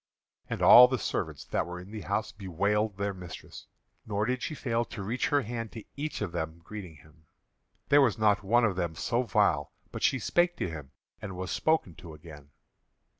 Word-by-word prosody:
And - - -3
all 125 +1 +10
the 130 +1 -1
servants 105 - -3
that - - -1
were 90 0 -6
in 90 +3 -11
the 110 -1 -6
house 100 +2 -2
bewailed 100 +2 -1
their 100 0 -1
mistress, 90 -2 -10 0.4
nor 105 0 -1
did 125 +2 -1
she 130 +7 -3
fail 120 -4 -1
to 100 - -7
reach 115 +6 -1
her 145 -2 +2
hand 115 0 -5
to 110 - -8
each 150 -2 -4
of 100 - -4
them 80 -1 -4
greeting 95 -4 -8
him. 80 +2 -21 0.6
There 145 0 +6
was 120 -7 +3
not 105 -2 +3
one 115 +4 +3
of 105 -5 0
them 85 -3 -2
so 120 +9 0
vile 100 - +1 0.2
but - - -6
she 135 - +3
spake 175 +6 +1
to - - -2
him 75 -4 -8 0.3
and 95 -3 -6
was 95 0 -4
spoken 155 - +1
to 80 -3 -10
again. 75 -2 -13
105 Hz, 200 wpm, -29 LUFS, 90-120 Hz, 0.6 s, all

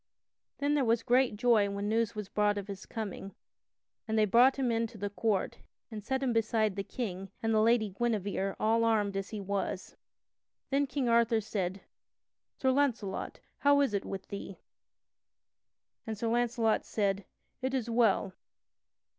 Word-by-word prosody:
Then 285 +1 +1
there 290 -2 +2
was 230 -1 +2
great 250 -3 +3
joy 220 -3 +4
when 200 +1 -3
news 225 0 0
was 210 -2 -5
brought 205 0 +1
of 200 0 -5
his 195 -2 -8
coming 200 -3 -6 0.7
and 220 0 0
they 215 - +5
brought 240 +6 +5
him 260 -3 0
in 230 0 +1
to 220 - -13
the 205 0 -3
court 205 -2 -1 0.3
and 215 -2 -6
set 265 +4 -1
him 250 -3 +1
beside 220 -2 +1
the 195 - -2
King 195 -4 -5
and 225 0 +1
the 215 - +4
Lady 225 -1 +3
Guinevere 195 -2 -1
all 225 +1 +2
armed 210 -3 +2
as 195 0 -3
he 215 - -5
was. 195 -1 -3 0.8
Then 280 +1 +2
King 270 -1 -1
Arthur 230 -1 +3
said: 195 -3 -3 0.8
"Sir 260 - +2
Launcelot, 250 -8 -1 0.2
how 285 0 +5
is 275 -7 +1
it 200 - 0
with 195 -1 -6
thee?" 200 -1 -7 1.5
and 220 -1 -3
Sir 230 +2 -1
Launcelot 235 -1 +1
said: 200 -2 -1 0.4
"It 260 +1 -1
is 245 -3 -1
well." 225 -5 +2
220 Hz, 165 wpm, -31 LUFS, 200-240 Hz, 1.5 s, they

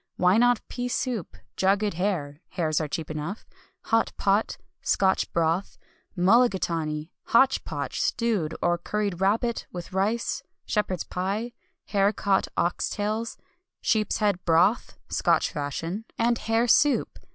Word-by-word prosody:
Why 180 +3 +4
not 245 -1 +3
pea 245 0 -4
soup, 245 - -3 0.2
jugged 200 +2 +2
hare 165 -5 -2
(hares 160 -3 0
are 155 - -2
cheap 155 +2 -4
enough), 155 +7 -5 0.4
hot 225 0 +2
pot, 200 +2 +1 0.2
Scotch 190 -1 +1
broth, 165 +3 0 0.4
mullagatawny, 175 -7 +2
hotch 265 +3 +4
potch, - - -3
stewed 210 -10 0
or 175 0 +2
curried 200 -1 -2
rabbit, 225 +4 +1
with 175 0 -8
rice, 210 +5 0 0.2
shepherd's 190 -5 -1
pie, 200 +6 -3 0.4
haricot 200 -1 +2
ox 175 - 0
tails, 215 +2 -2 0.4
sheep's 215 -3 +1
head 205 -4 0
broth 175 +7 +2
(Scotch - - +2
fashion), 165 +7 -4
and 235 +1 +2
hare 225 +2 +1
soup! 290 +4 +3
195 Hz, 125 wpm, -26 LUFS, 175-225 Hz, 0.4 s, Why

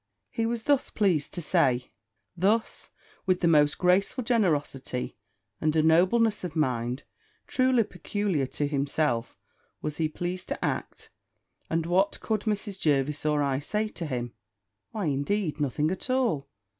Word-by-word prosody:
He 225 0 0
was 230 -1 -2
thus 285 0 +2
pleased 180 -9 +1
to 175 - -4
say: 125 -4 +2 0.4
thus, 205 +6 +1 0.4
with 185 -1 +2
the 170 - +3
most 150 -3 +4
graceful 190 +8 +2
generosity, 150 - 0 0.5
and 155 0 +1
a 155 - +4
nobleness 190 +7 +4
of 175 -3 -5
mind 125 -4 0 0.4
truly 255 -2 +3
peculiar 180 -5 -2
to 145 - -2
himself, 140 -3 0 0.4
was 150 -1 -4
he 160 -2 +1
pleased 175 +3 -4
to - - -2
act: - - -4 0.6
and 165 0 0
what 190 +4 +2
could 220 -2 -1
Mrs. 205 -2 -3
Jervis 150 0 +1
or 150 -1 +2
I 135 -1 0
say 210 +9 -1
to 170 -6 -6
him? 120 -3 -3 0.6
Why, 215 -5 -3
indeed, 155 +4 0
nothing 150 +3 0
at 190 - -4
all! 230 - +1
165 Hz, 145 wpm, -27 LUFS, 145-205 Hz, 0.6 s, most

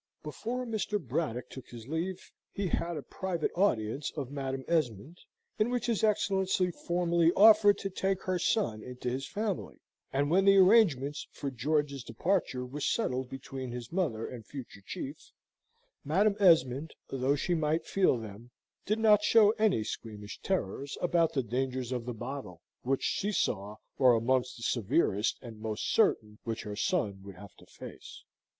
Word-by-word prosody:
Before 235 +11 -4
Mr. 215 -2 -1
Braddock 125 - -3
took 130 - -10
his 115 -1 -10
leave, 175 +5 -4 0.2
he 200 - -3
had 170 0 -1
a 145 - -5
private 180 -4 -3
audience 135 - 0
of 135 -3 -4
Madam 135 -2 -4
Esmond, 155 - -1 0.4
in 215 +2 +3
which 245 -1 -1
his 230 -3 0
Excellency 190 -3 +2
formally 170 -1 +1
offered 210 -1 +7
to 195 - -4
take 190 0 -1
her 185 -1 -1
son 115 - 0
into 125 +1 -5
his 135 +2 -3
family; 205 -2 -3 0.3
and 145 +2 0
when 190 +3 +4
the 195 0 +7
arrangements 180 - +4
for 140 - -5
George's 140 +1 -1
departure 125 - -1
were 135 +4 -7
settled 130 - 0
between 135 -1 -6
his 120 -1 -7
mother 155 -12 -1
and 120 -4 -9
future 130 -8 -9
chief, 140 +8 -7 0.7
Madam 195 +8 +2
Esmond, 155 -6 +3
though 135 +1 +1
she 175 +5 -1
might 160 0 0
feel 190 -9 +2
them, 110 +1 -9 0.4
did 215 +2 +1
not 215 -2 +5
show 210 0 +6
any 215 - +3
squeamish 105 -1 -7
terrors 140 - -2
about 170 -2 +2
the 135 - 0
dangers 130 +1 -2
of 125 -2 -3
the 125 - -2
bottle, 120 -8 -7 0.2
which 135 +2 -1
she 205 +1 0
saw 105 - -1 0.2
were 130 -3 +6
amongst 125 +2 0
the 115 - -9
severest 115 - +1
and 115 -3 -9
most 110 -1 -3
certain 105 - +2
which 115 -1 -4
her 105 -1 -5
son 105 - -1
would 100 -1 -10
have 100 0 -12
to - - -19
face. - - -11
140 Hz, 165 wpm, -30 LUFS, 120-185 Hz, 0.7 s, offered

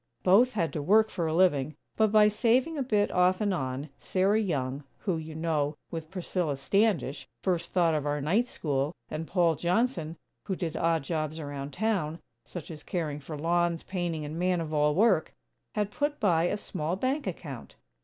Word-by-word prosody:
Both 230 +8 +5
had 170 -7 -1
to 150 - -2
work 215 +8 +4
for 170 -3 -1
a 155 - -1
living; 155 -5 +3 0.2
but 220 -2 +3
by 210 -1 +7
saving 245 +8 +2
a 285 - -1
bit, 210 -5 +1
off 180 +1 +3
and 205 -3 +1
on, 135 -2 -3
Sarah 195 +3 +2
Young, 140 -7 -2 0.2
who, 185 -5 0
you 160 0 -7
know, 155 -2 0 0.2
with 160 -2 -5
Priscilla 175 -5 -2
Standish 145 - +1 0.2
first 175 -2 0
thought 170 -3 +3
of 150 -1 -1
our 145 0 0
Night 195 - +2
School, 145 - -2 0.2
and 160 +1 -4
Paul 175 -3 +3
Johnson, 170 - 0 0.3
who 190 - -1
did 170 -3 -3
odd 165 -2 +1
jobs 155 0 -2
around 145 -2 -5
town, 185 -7 0 0.3
such 175 +2 -7
as 155 -2 -9
caring 155 -5 -3
for 150 +2 -7
lawns, 170 +1 +1
painting 175 -5 -3
and 155 +3 -5
"man 180 0 +2
of 160 -1 -4
all 150 0 +3
work," 195 -5 +3 0.4
had 210 -1 0
put 290 +5 -1
by 175 -6 +3
a 200 - 0
small 170 -4 -3
bank 265 +8 -1
account. - - -7
170 Hz, 185 wpm, -29 LUFS, 155-200 Hz, 0.4 s, by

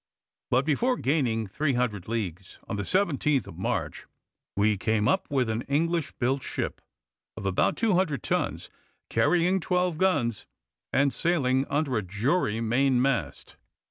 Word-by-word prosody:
But 130 +2 +2
before 245 - +1
gaining 125 -6 0
300 125 - -1
leagues, 95 -5 -4
on - - -3
the 100 - -2
17th 150 - +1
of 90 -4 -11
March - - -3 0.5
we 105 +1 +3
came 105 +1 0
up - - +1
with 130 -4 +1
an 110 +1 -1
English 165 +3 0
built 130 +2 0
ship - - -4 0.6
of - - -6
about 95 -1 +1
200 185 - +1
tons, - - -2 0.4
carrying 180 +2 +3
twelve 180 -2 0
guns, 145 - +1 0.4
and 140 0 +2
sailing 140 -6 +1
under 140 -4 0
a - - +1
jury 105 - 0
main 125 +3 +2
mast. 125 - -1
130 Hz, 140 wpm, -27 LUFS, 110-160 Hz, 0.6 s, we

